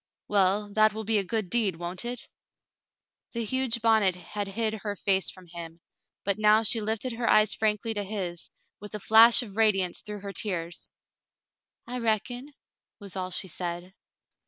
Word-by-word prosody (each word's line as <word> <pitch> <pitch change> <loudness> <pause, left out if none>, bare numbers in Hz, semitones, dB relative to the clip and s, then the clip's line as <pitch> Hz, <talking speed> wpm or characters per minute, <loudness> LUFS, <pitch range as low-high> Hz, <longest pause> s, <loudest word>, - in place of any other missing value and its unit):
"Well, 205 +1 +1
that 215 0 +4
will 220 +1 -5
be 220 0 +2
a - - -1
good 215 +1 -2
deed, 205 -2 +1
won't 175 +5 -5
it? 245 +1 -4 0.5
" - - -65
The 235 -1 -2
huge 245 -1 -1
bonnet 220 -5 +4
had 200 +3 -5
hid 215 +2 -1
her 205 -1 -3
face 195 -1 +1
from 185 -1 -11
him, 165 -1 -8 0.4
but 200 +1 0
now 215 +1 +5
she 225 +1 +2
lifted 220 +3 -2
her 230 0 -1
eyes 215 0 +5
frankly 220 +1 0
to 205 -1 -2
his, 190 -4 -4 0.3
with 210 +1 -8
a - - -4
flash 225 +4 +7
of 205 -3 -11
radiance 195 -5 +2
through 210 -1 -7
her 200 0 -7
tears. 175 -5 -2 1.0
"I 250 +1 -5
reckon," 245 +4 -1 0.5
was 200 -2 -9
all 185 -1 -3
she 185 - -2
said. 175 +1 -5
210 Hz, 175 wpm, -27 LUFS, 190-225 Hz, 1.0 s, flash